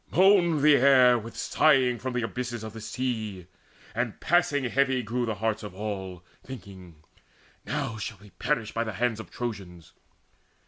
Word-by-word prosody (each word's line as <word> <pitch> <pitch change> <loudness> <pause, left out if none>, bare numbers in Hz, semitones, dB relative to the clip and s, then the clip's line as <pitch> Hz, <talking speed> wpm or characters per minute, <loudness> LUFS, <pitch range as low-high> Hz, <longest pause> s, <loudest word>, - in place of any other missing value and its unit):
Moaned 175 -5 +4
the 150 -1 +7
air 130 -2 +6
With 115 +1 -10
sighing 130 -5 +3
from 130 -1 -4
the 125 -1 -1
abysses 120 -1 -4
of 110 -1 -7
the 115 - -8
sea; 110 -7 -4 0.5
And 120 -1 -2
passing 170 -5 +2
heavy 130 0 +1
grew 120 +2 -2
the 110 - -1
hearts 110 +1 -1
of 105 -3 -8
all, 95 -3 -5 0.2
Thinking: 95 -10 -11 0.6
"Now 110 - -2
shall 110 0 -5
we 105 0 -16
perish 120 -8 -2
by 115 - -1
the 110 -2 -5
hands 115 +2 -1
Of 110 - -9
Trojans!" 95 -8 -7
115 Hz, 165 wpm, -27 LUFS, 105-130 Hz, 0.6 s, the